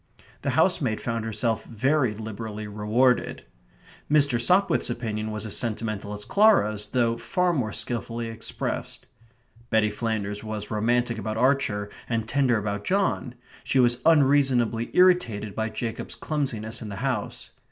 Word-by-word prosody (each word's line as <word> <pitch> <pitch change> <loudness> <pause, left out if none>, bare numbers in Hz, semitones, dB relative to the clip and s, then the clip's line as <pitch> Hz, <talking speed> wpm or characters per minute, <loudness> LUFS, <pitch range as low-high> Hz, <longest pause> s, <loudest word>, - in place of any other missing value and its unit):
The - - -1
housemaid 110 - +2
found 115 -1 -3
herself 110 0 -1
very 130 0 +1
liberally 110 0 -6
rewarded. 110 +5 +1 0.7
Mr. 145 -5 +4
Sopwith's 185 +7 +3
opinion 110 -3 -3
was 110 0 -5
as 110 - -2
sentimental 110 -3 -3
as 105 0 -6
Clara's, 110 - +3
though 115 -1 0
far 175 +10 +1
more 125 -9 -1
skilfully 115 +2 -3
expressed. 115 0 -4 0.6
Betty 110 -2 +2
Flanders 105 -2 -3
was 110 -1 -5
romantic 115 +2 +1
about 110 +1 -3
Archer 125 -5 +1 0.2
and 115 -2 -1
tender 130 -2 +2
about 105 -1 -3
John; 185 - 0 0.3
she - - 0
was 120 -1 +4
unreasonably 135 -7 +3
irritated 125 - +3
by 110 +2 -2
Jacob's 110 +1 -4
clumsiness 120 -7 -3
in 110 - -6
the 100 - -6
house. 125 -6 -3
115 Hz, 135 wpm, -25 LUFS, 110-125 Hz, 0.7 s, Mr